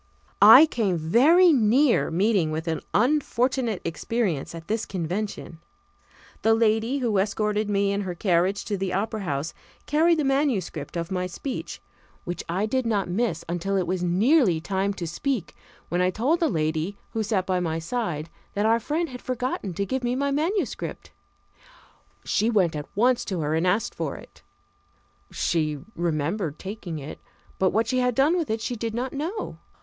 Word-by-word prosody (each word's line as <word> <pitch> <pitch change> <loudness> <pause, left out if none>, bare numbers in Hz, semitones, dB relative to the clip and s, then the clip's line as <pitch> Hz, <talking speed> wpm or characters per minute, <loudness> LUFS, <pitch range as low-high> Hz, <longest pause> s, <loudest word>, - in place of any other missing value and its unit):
I 315 - +10
came 210 - 0
very 295 - +5
near 250 +2 +3
meeting 185 -1 +2
with 160 +2 -4
an 160 -1 -1
unfortunate 255 - +1
experience 170 - -2
at 165 0 -9
this 220 +1 -1
convention. 185 -1 -4 0.8
The 225 0 +4
lady 225 +3 +2
who 230 -7 +1
escorted 210 +1 0
me 200 -1 +1
in 200 0 -1
her 185 -3 -4
carriage 185 +2 +1
to 205 - -2
the 190 -1 -2
Opera 215 +3 -2
House 145 -3 -3 0.3
carried 325 +3 +3
the 305 - +1
manuscript 240 - -1
of 170 +2 -4
my 180 -1 -1
speech, 250 +8 -6 0.4
which 175 0 -5
I 185 +5 0
did 255 +2 -1
not 205 -5 0
miss 195 -4 -1
until 175 +3 -1
it 185 - +1
was 185 +1 -2
nearly 190 - +3
time 195 +3 -1
to 175 - -4
speak, 220 - -3 0.3
when 175 +1 0
I 180 - +3
told 260 - 0
a 330 - +4
lady 160 - -1
who 225 - -2
sat 205 -3 0
by 185 -1 0
my 165 -2 -1
side 165 -3 -3 0.3
that 205 +1 0
our 225 +1 +4
friend 310 +8 -1
had 250 -1 -8
forgotten 250 -7 -3
to 200 - -1
give 260 +6 -2
me 245 +1 0
my 280 +1 0
manuscript. 330 +8 -2 1.1
She 220 - +1
went 185 -8 +2
at 150 -1 -6
once 245 +4 +3
to 185 -4 -3
her 150 0 -1
and 165 +3 +1
asked 200 +5 +1
for - - -3
it. - - -14 0.9
She 155 -3 0 0.2
remembered 165 0 -1
taking 190 -4 -6
it, 145 +1 -8 0.4
but 190 - +3
what 225 +4 +1
she 255 +3 0
had 250 -1 +1
done 285 +7 +3
with 335 -4 -1
it 220 0 -1
she 245 +2 -3
did 225 0 -4
not 255 +2 -3
know. 335 +10 -4
205 Hz, 175 wpm, -25 LUFS, 175-245 Hz, 1.1 s, I